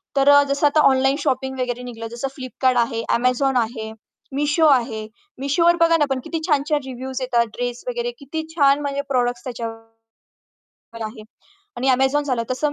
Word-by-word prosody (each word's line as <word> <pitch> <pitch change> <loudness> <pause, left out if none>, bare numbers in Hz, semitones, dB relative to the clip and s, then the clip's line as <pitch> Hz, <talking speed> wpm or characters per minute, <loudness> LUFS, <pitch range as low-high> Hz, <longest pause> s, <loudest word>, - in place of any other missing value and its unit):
तर 275 0 +4
अ, 285 0 +8
जसं 280 +1 +3
आता 300 +2 +2
ऑनलाईन 270 +1 +2
शॉपिंग 265 -2 -2
वगैरे 250 -1 -2
निघलं 230 -2 -7
जसं 240 +3 -3
Flipkart 255 0 0
आहे, 230 -1 -1
Amazon 255 +2 +1
आहे, 220 -1 -6 0.5
Meesho 295 +2 +3
आहे, 230 -4 +1 0.4
Meeshoवर 335 +5 +3
बघा 330 0 +5
ना 295 - +3
पण 265 -1 0
किती 330 - -3
छान-छान 295 -1 +1
रिव्ह्यूज 260 +1 -6
येतात 240 -2 +2
ड्रेस 245 0 -3
वगैरे 485 -1 -2
किती 305 +3 -5
छान 280 -2 +4
म्हणजे 280 -1 -2
प्रॉडक्ट्स 245 -2 0
त्याच्यावर 225 -2 -9 0.9
आहे. 215 0 -7 0.5
आणि 260 +2 -1
Amazon 265 +3 +2
झालं. 255 -5 -1
तसं 290 +3 0
260 Hz, 165 wpm, -21 LUFS, 245-285 Hz, 0.9 s, अ